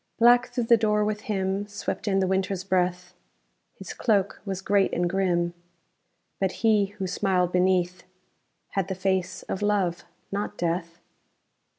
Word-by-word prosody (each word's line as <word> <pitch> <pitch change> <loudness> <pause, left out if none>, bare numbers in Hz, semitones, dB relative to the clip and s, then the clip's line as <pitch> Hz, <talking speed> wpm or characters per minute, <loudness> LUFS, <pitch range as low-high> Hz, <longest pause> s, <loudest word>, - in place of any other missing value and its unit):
_ - - -50
Black 240 +2 +6
through 245 - -2
the 230 0 +5
door 210 -1 +2
with 210 0 -2
him 195 0 -1
Swept 205 +1 -5
in 195 -1 +2
the 190 - +2
Winter's 190 0 -1
breath; 180 -1 0 0.6
His - - -8
cloak 200 -5 0
was 195 -2 -3
great 200 0 +2
and 175 0 +1
grim 175 -2 0 0.9
But 190 -1 +1
he, 210 -3 +4
who 195 - -2
smiled 180 -1 +1
beneath, 180 0 +1 0.7
Had 195 -3 -1
the 190 - -3
face 190 -1 -1
of 190 - -4
Love 195 -5 0 0.3
not 200 +1 -3
Death. 170 0 -2
190 Hz, 155 wpm, -26 LUFS, 180-205 Hz, 0.9 s, Black